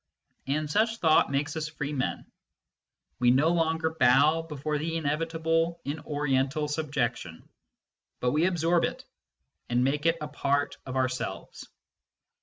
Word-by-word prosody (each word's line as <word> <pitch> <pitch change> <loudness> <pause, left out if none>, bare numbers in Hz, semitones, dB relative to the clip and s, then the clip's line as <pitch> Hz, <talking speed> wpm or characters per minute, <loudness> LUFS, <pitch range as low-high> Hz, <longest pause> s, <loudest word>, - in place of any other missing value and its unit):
And 150 +3 0
such 220 +8 +1
thought 160 -5 +4
makes 140 +2 -1
us 155 -1 -2
free 150 -1 -5
men; 130 -3 -2 0.9
we 125 -1 +4
no 135 +6 +4
longer 160 -1 +1
bow 140 +6 +5
before 150 -1 -3
the 165 +2 -2
inevitable 165 +2 0
in 145 +3 -3
Oriental 145 0 -1
subjection, 135 - -3 0.7
but 125 - +1
we 155 +5 +2
absorb 170 -1 +2
it, - - -3 0.6
and 120 +1 +2
make 145 +4 +1
it 165 0 +2
a 150 - -4
part 145 -1 -1
of 130 - -5
ourselves. 130 -1 -3
150 Hz, 135 wpm, -28 LUFS, 135-160 Hz, 0.9 s, bow